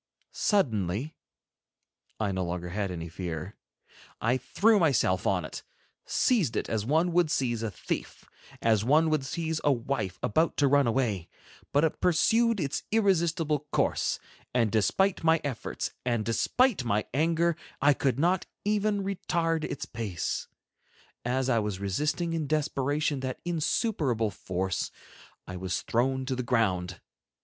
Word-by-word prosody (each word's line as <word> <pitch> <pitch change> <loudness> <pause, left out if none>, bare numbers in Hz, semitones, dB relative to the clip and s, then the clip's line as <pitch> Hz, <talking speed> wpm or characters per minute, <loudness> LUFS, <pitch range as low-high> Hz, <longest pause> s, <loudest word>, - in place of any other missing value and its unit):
Suddenly—I 110 - -3
no 95 -1 -1
longer 90 0 -4
had 100 +2 -2
any 85 -2 -5
fear—I 90 +7 -5
threw 205 - +3
myself 130 - +2
on 90 -4 +1
it, - - -7 0.5
seized 210 - +2
it - - -1
as 110 -2 -1
one 160 +8 +2
would 170 -2 +3
seize 120 -7 0
a 115 - -1
thief, 95 - -5 0.4
as 110 -2 +3
one 155 +6 +4
would 155 -3 +1
seize 160 +3 -2
a 145 - +4
wife 120 -7 -2
about 160 +9 +1
to 145 - +4
run 140 -1 +4
away; 110 -8 0 0.4
but 145 +2 +3
it 160 - 0
pursued 225 +6 +3
its 140 -4 -1
irresistible 165 -8 +1
course, - - +1 0.4
and 115 -4 +3
despite 180 - +2
my 165 0 +4
efforts 135 -5 -3
and 120 -3 0
despite 210 - +2
my 105 -3 0
anger, 165 +3 +2 0.2
I 145 +1 +5
could 135 -2 0
not 175 +5 +1 0.2
even 210 -1 +1
retard 170 -4 -1
its - - -4
pace. 105 -8 -3 0.8
As 125 +2 0
I 120 -3 +3
was 105 -3 -2
resisting 150 - -1
in 160 -3 -1
desperation 145 -1 0
that 130 -1 -4
insuperable 155 - 0
force, 95 0 -2 0.6
I 95 - -7
was 90 0 -2
thrown 130 +3 0
to 130 0 -1
the 125 - -2
ground. 95 -8 0
135 Hz, 140 wpm, -28 LUFS, 105-165 Hz, 0.8 s, I